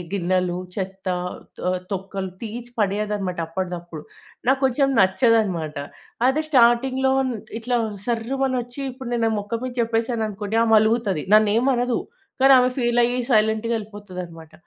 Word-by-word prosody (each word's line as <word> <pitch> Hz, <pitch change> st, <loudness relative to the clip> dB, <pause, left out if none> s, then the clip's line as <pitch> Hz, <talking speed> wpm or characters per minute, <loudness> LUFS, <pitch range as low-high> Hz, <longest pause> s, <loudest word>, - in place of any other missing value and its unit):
గిన్నెలు 180 Hz, -1 st, 0 dB, 0.2 s
చెత్త, 190 Hz, -1 st, -5 dB, 0.5 s
తొ 180 Hz, -, -1 dB, 0.2 s
తొక్కలు 195 Hz, 0 st, -4 dB
తీసి 235 Hz, +2 st, -6 dB
పడేయదన్నమాట 205 Hz, -3 st, -1 dB
అప్పటిదప్పుడు. 175 Hz, -2 st, -5 dB, 0.5 s
నాకు 265 Hz, 0 st, +3 dB
కొంచెం 270 Hz, +2 st, +2 dB
నచ్చదన్నమాట 190 Hz, -, +2 dB, 0.5 s
అదే 290 Hz, +4 st, +2 dB
స్టార్టింగ్‌లో 260 Hz, +1 st, +4 dB, 0.5 s
ఇట్లా 245 Hz, +1 st, 0 dB, 0.3 s
సర్రుమనొచ్చి 245 Hz, +2 st, -2 dB
ఇప్పుడు 255 Hz, -1 st, -8 dB
నేను 230 Hz, -1 st, +1 dB
నా -, -, +2 dB
మొఖం 225 Hz, +3 st, -4 dB
మీద 255 Hz, -1 st, -5 dB
చెప్పేసాననుకోండి 225 Hz, -2 st, -1 dB
ఆమె 225 Hz, -1 st, +3 dB
అలుగుతది. 220 Hz, -7 st, +1 dB
నన్నేం 215 Hz, +4 st, +4 dB
అనదు. 245 Hz, 0 st, 0 dB, 0.4 s
కానీ 270 Hz, 0 st, +8 dB
ఆమె 250 Hz, 0 st, +3 dB
ఫీల్ 240 Hz, -1 st, +2 dB
అయ్యి 245 Hz, +1 st, 0 dB
సైలెంట్‌గా 220 Hz, +1 st, +2 dB
ఎళ్ళిపోతదన్నమాట 180 Hz, -6 st, -9 dB
225 Hz, 125 wpm, -23 LUFS, 190-245 Hz, 0.5 s, కానీ